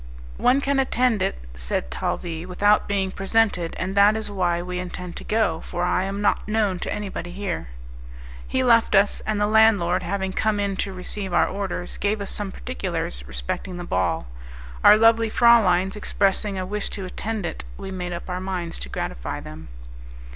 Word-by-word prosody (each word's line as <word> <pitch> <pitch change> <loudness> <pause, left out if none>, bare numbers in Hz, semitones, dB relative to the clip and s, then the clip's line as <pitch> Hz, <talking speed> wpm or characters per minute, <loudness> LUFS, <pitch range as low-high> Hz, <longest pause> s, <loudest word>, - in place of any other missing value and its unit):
"One 260 +3 +3
can 280 0 +1
attend 250 -5 +2
it," 65 - 0 0.2
said - - -3
Talvis, 165 - -3
"without 205 +3 +3
being 195 -2 0
presented, 195 -3 +1
and 185 +1 -2
that 200 +2 +6
is 220 -1 -3
why 175 -3 +1
we 180 +1 -4
intend 180 -1 -6
to - - -8
go, 210 -7 +1
for 175 - -3
I 185 +1 +1
am 195 +1 -3
not 205 - +1
known 210 -4 +1
to - - -3
anybody 195 -4 -4
here." 190 - -4 0.8
He 260 - 0
left 230 -3 +4
us, 200 +1 +3
and 215 -1 0
the 205 - +3
landlord, 205 -5 +4
having 190 +1 -2
come 215 0 +1
in 200 -1 -1
to 195 - -2
receive 190 +1 -6
our 175 - +4
orders, 195 -3 -4
gave 205 +1 0
us 200 - -4
some 205 -2 -4
particulars 60 - -4
respecting 65 - -4
the 175 - -5
ball. 90 - 0 0.6
Our - - +9
lovely 225 0 +4
frauleins 195 -6 +4
expressing 200 -1 0
a 185 - -2
wish 205 +2 -3
to 195 - -5
attend 210 +2 -4
it, 60 - -5
we 190 - -7
made 180 -1 -4
up 170 - -6
our 180 0 -3
minds 185 -3 -4
to 60 - -5
gratify - - -4
them. 80 +1 -10
195 Hz, 185 wpm, -24 LUFS, 175-210 Hz, 0.8 s, Our